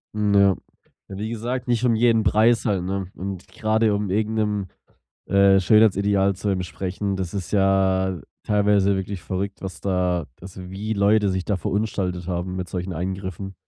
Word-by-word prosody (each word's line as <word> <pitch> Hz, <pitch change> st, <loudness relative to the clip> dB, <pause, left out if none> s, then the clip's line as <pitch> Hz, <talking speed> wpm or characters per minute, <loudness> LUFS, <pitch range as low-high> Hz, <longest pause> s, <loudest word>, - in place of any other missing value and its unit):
Hm, 105 Hz, -1 st, +1 dB
ja. 100 Hz, -1 st, +5 dB, 0.5 s
Ja, 95 Hz, -, -8 dB
wie 110 Hz, +1 st, -3 dB
gesagt, 120 Hz, +2 st, -4 dB
nicht 120 Hz, 0 st, +1 dB
um 115 Hz, -, +4 dB
jeden 115 Hz, -1 st, +3 dB
Preis 115 Hz, +2 st, +3 dB
halt, 100 Hz, -5 st, 0 dB
ne? 95 Hz, 0 st, -3 dB
Und, 95 Hz, -1 st, -6 dB
grade 110 Hz, -1 st, +1 dB
um 100 Hz, -1 st, -1 dB
irgend 110 Hz, +3 st, 0 dB
'nem, 105 Hz, -3 st, -1 dB, 0.6 s
äh, 100 Hz, 0 st, +5 dB
Schönheitsideal 100 Hz, -1 st, +3 dB
zu 100 Hz, +2 st, -3 dB
entsprechen, 95 Hz, +1 st, -3 dB
das 95 Hz, 0 st, -4 dB
ist 95 Hz, -3 st, -4 dB
ja 95 Hz, -2 st, +2 dB, 0.2 s
teilweise 100 Hz, -1 st, +2 dB
wirklich 95 Hz, -1 st, -4 dB
verrückt, 95 Hz, +5 st, -4 dB
was 95 Hz, -3 st, -7 dB
da 90 Hz, -3 st, 0 dB, 0.2 s
also, 95 Hz, 0 st, -10 dB
wie 105 Hz, +3 st, -3 dB
Leute 100 Hz, 0 st, +3 dB
sich 95 Hz, -1 st, -2 dB
da 100 Hz, -3 st, 0 dB
verunstaltet 95 Hz, -1 st, -2 dB
haben 90 Hz, +1 st, -3 dB
mit 90 Hz, -1 st, -4 dB
solchen 90 Hz, 0 st, -4 dB
Eingriffen. 95 Hz, +2 st, -5 dB
100 Hz, 165 wpm, -23 LUFS, 95-105 Hz, 0.6 s, ja